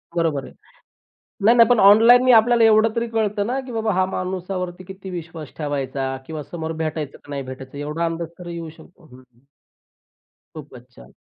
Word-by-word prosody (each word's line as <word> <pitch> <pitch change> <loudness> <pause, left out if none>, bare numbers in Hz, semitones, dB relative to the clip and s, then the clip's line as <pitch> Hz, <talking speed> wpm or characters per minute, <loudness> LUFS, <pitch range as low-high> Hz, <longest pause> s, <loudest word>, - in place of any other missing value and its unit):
बरोबर 160 -5 0
आहे. - - -13 0.9
नाही, 230 +3 +6
नाही. 230 -1 +6
पण 245 -3 +4
ऑनलाईननी 235 +5 +7
आपल्याला 230 +1 +5
एवढं 220 0 +4
तरी 230 - 0
कळतं 210 -2 -1
ना, 255 +3 -2
की 260 -1 -10
बाबा 220 -2 -1
हा 185 +1 +2
माणसावरती 185 -1 -4
किती 190 0 -10
विश्वास 165 -4 -7
ठेवायचा 135 -3 -3
किंवा 155 -2 -6
समोर 160 +1 -6
भेटायचं 155 -2 -4
की - - -17
नाही 140 -1 -4
भेटायचं? 130 +1 -10
एवढा 150 +3 -3
अंदाज 170 +1 -5
येऊ 170 -1 -6
शकतो 175 - -18
हं, 125 - -14
हं. 125 -2 -23 1.2
खूपच 130 -5 -12
छान. - - -16
175 Hz, 170 wpm, -21 LUFS, 150-215 Hz, 1.2 s, ऑनलाईननी